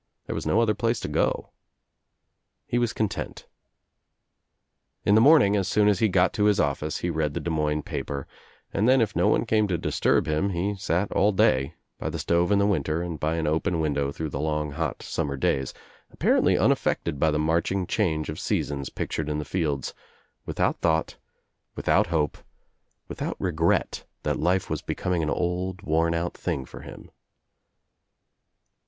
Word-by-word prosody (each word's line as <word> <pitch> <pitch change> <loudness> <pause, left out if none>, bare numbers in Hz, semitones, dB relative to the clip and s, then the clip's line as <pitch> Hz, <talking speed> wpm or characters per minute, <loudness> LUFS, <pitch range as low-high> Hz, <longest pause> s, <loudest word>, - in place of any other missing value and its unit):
There - - -4
was - - -4
no - - +3
other 115 -2 +3
place 115 +1 0
to - - -3
go. - - -1 1.1
He 120 - 0
was 120 -2 +1
content. 110 -3 -3 1.6
In 100 - +4
the 110 - +6
morning 135 -8 +6
as 95 -3 0
soon 105 -1 +3
as 100 -3 +3
he 110 - +3
got 90 0 +3
to 105 - +1
his 105 -1 +3
office 75 +2 -1
he 90 - 0
read 80 -3 -1
the - - -1
Des 85 - -3
Moines 75 -1 0
paper 70 -1 -4 0.5
and 110 +5 +2
then 130 +1 +5
If 105 -4 0
no - - +3
one 110 - +2
came 110 -2 +2
to 90 -3 0
disturb - - +1
him 80 +5 0
he 95 +2 -1
sat 95 0 -1
all 105 +2 +3
day, 70 -5 +2 0.2
by - - -3
the - - -4
stove 85 +2 +1
in 100 0 +4
winter 80 -3 0
and 85 -3 -5
by 80 +2 0
an 80 -1 -1
open 80 +3 0
window 70 -3 0
through 80 +1 -4
the 70 - -4
long 75 0 -1
hot 80 -1 -3
summer 70 -1 -2
days, 65 0 0 0.4
apparently - - +3
unaf - - +3
fected 70 - -1
by 80 - +3
the 75 - 0
marching 85 +5 0
change 80 -7 0
of 75 - -5
seasons 70 -2 -2
pictured 75 -1 -3
in 75 - -1
the 75 - -4
fields, 75 -4 -2 0.5
without - - 0
thought, 80 -1 +1 0.6
without - - +2
hope, 80 -3 -1 0.7
without - - -4
re 90 - -1
gret 80 +1 0 0.2
that - - -1
life 90 +3 +1
was - - -3
becoming 90 -3 -2
an 75 - -1
old 90 +2 -2
worn 85 +1 +1
out 85 +1 -2
thing 65 - -3
for - - -11
him. - - -11
85 Hz, 180 wpm, -26 LUFS, 75-100 Hz, 1.6 s, the